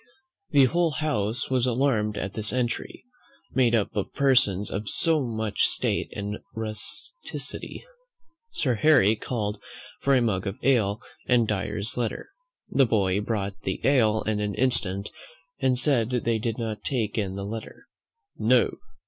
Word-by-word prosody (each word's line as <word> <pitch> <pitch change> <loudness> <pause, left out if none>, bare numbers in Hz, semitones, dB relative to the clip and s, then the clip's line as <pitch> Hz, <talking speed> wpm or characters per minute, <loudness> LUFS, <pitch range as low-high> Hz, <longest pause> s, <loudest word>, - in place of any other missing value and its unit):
The 140 -2 +6
whole 170 +6 +2
house 130 -4 -1
was 130 -1 +2
alarmed 115 -4 +1
at 100 - -3
this 110 -1 0
entry, 120 -2 -2 0.5
made 120 -3 +3
up 110 -1 0
of 100 - -2
persons 125 -8 +3
of 100 +1 -3
so 160 -2 +2
much 110 -3 0
state - - -1
and 100 +1 -4 0.2
rusticity. 115 - -5 0.7
Sir 130 -5 0
Harry 115 -4 +5
called 105 -2 -3 0.4
for 140 0 +3
a 130 - +4
mug 100 -4 0
of 100 - -4
ale 115 -5 +2 0.2
and 120 -3 +4
Dyer's 105 +1 -2
Letter. 120 - -2 0.4
The 135 -3 +4
boy 100 -3 +2
brought 100 -3 -3
the 95 - -3
ale 110 -6 +3
in 110 -1 -1
an 105 -1 -2
instant, 105 -6 +1 0.5
but 130 - +3
said 125 -4 +2
they 115 -2 0
did 115 0 -2
not 110 -3 -4
take 115 -6 -1
in 100 -4 -1
the 100 0 -4
Letter. 110 +2 -7 0.5
"No!" - - +4
110 Hz, 150 wpm, -26 LUFS, 105-130 Hz, 0.7 s, The